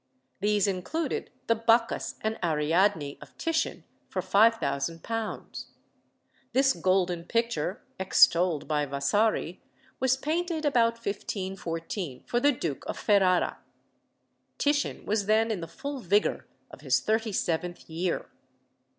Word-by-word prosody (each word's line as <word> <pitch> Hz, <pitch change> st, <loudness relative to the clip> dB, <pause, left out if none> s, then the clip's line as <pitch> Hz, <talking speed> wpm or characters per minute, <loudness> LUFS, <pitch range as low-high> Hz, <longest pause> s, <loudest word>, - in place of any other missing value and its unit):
These 205 Hz, 0 st, +2 dB
included 205 Hz, -, -2 dB, 0.2 s
the 230 Hz, -, +3 dB
"Bacchus 230 Hz, +1 st, +1 dB
and 220 Hz, +1 st, -2 dB
Ariadne" 160 Hz, 0 st, +1 dB
of -, -, -14 dB
Titian, 330 Hz, -1 st, -1 dB, 0.3 s
for -, -, -3 dB
£5000. 205 Hz, 0 st, 0 dB, 0.9 s
This 270 Hz, +1 st, +4 dB
golden 180 Hz, -2 st, +1 dB
picture 220 Hz, -6 st, -1 dB, 0.2 s
(extolled 180 Hz, -3 st, +4 dB
by 150 Hz, -2 st, 0 dB
Vasari) 170 Hz, +6 st, 0 dB, 0.4 s
was 260 Hz, 0 st, +2 dB
painted 320 Hz, +2 st, -1 dB
about 235 Hz, -5 st, +3 dB
1514 190 Hz, -, -4 dB
for 240 Hz, -, 0 dB
the 285 Hz, +4 st, +4 dB
Duke 165 Hz, -, -4 dB
of -, -, -4 dB
Ferrara. 190 Hz, -3 st, +2 dB, 1.0 s
Titian 290 Hz, 0 st, 0 dB
was 205 Hz, -1 st, 0 dB
then 220 Hz, +1 st, +3 dB
in 210 Hz, -, -2 dB
the 165 Hz, -, -5 dB
full 280 Hz, -, -6 dB
vigour 205 Hz, 0 st, +1 dB, 0.2 s
of -, -, -12 dB
his 130 Hz, -3 st, +2 dB
thirty 220 Hz, -, 0 dB
seventh 175 Hz, -1 st, -2 dB
year. 170 Hz, +2 st, -2 dB
200 Hz, 115 wpm, -28 LUFS, 170-230 Hz, 1.0 s, This